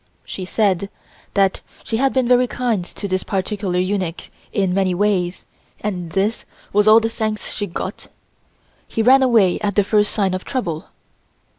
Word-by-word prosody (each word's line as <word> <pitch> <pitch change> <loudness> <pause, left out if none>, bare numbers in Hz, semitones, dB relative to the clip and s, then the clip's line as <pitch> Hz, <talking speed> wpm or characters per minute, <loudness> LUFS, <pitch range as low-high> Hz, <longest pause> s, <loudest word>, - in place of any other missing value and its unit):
She 185 - -6
said 200 -1 +1 0.5
that 195 -1 +2 0.2
she 225 - -2
had 270 +2 +2
been 260 -2 +1
very 250 0 +4
kind 240 -7 -1
to 200 - -6
this 185 -1 0
particular 195 -1 -2
eunuch 185 -2 -2 0.2
in 190 -3 0
many 185 -1 +1
ways, 185 -2 0 0.4
and 180 -5 -3
this 205 +4 0 0.3
was 210 +1 +3
all 215 +1 +8
the 225 - -1
thanks 220 -1 -3
she 205 - -3
got; 175 - -6 0.8
he 225 - -1
ran 265 +3 +6
away 225 -8 +4
at 205 -2 -2
the 205 - +4
first 210 +1 +2
sign 195 -3 0
of 185 - -3
trouble. 175 - -3
205 Hz, 165 wpm, -20 LUFS, 185-220 Hz, 0.8 s, all